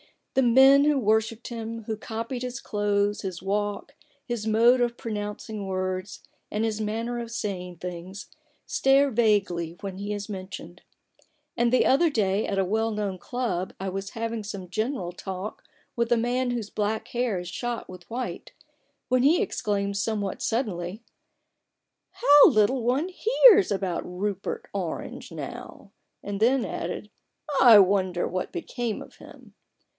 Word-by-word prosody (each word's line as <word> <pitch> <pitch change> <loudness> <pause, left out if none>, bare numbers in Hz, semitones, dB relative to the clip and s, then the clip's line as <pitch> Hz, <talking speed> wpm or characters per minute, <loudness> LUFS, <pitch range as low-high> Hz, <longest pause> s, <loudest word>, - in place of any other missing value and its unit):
The 265 - +3
men 265 +3 +6
who 300 -1 +3
wor 220 -3 +3
shipped 225 +1 -8
him, 230 -1 -5
who 220 +1 -3
copied 230 +3 -5
his 250 +1 -4
clothes, 205 -2 0
his 185 -3 -5
walk, 205 +6 -2 0.3
his 235 -3 -3
mode 235 +3 +5
of 240 -1 0
pronouncing 210 -1 -5
words, 185 0 -3 0.3
and 210 +1 -1
his 220 -1 -1
manner 230 +3 -2
of 235 -1 -5
saying 185 -6 -4
things, 180 +3 -7 0.3
stare 275 +1 +3
vaguely 200 -7 +1
when 195 -2 -5
he 205 +1 -3
is 205 +1 -5
mentioned. 185 -3 -8 0.7
And 235 0 +2
the 255 - +4
other 325 +6 +4
day 210 -6 +1
at 195 - -2
a 195 - +2
well 220 +4 0
known 205 -3 -3
club 190 -8 -3
I 190 0 -3
was 195 +1 -5
having 230 -1 -3
some 200 -3 -7
general 215 -2 -2
talk 190 +2 -7 0.3
with 235 0 0
a 240 - +5
man 245 +2 0
whose 230 -4 -3
black 215 +1 -2
hair 240 -5 -1
is 175 -1 -5
shot 240 +4 -4
with 180 -1 -12
white, 250 +2 -5 0.6
when 255 0 +3
he 310 +6 +5
exclaimed 200 - -1
somewhat 205 -2 -2
suddenly: 210 -3 -2 0.5
*' - - -56
How 290 - +8
little 215 +5 +3
one 265 +9 +1
hears 430 +1 +6
about 190 -3 -1
Rupert 200 - -4
Orange - - -5
now! - - -8 0.2
" - - -53
and 200 -1 -4
then 245 +4 +3
added: - - -5 0.3
" 300 - -11
I 230 -5 +9
wonder 185 -2 +2
what 185 0 -4
became 245 - -3
of - - -17
him - - -15
215 Hz, 160 wpm, -26 LUFS, 195-240 Hz, 0.7 s, I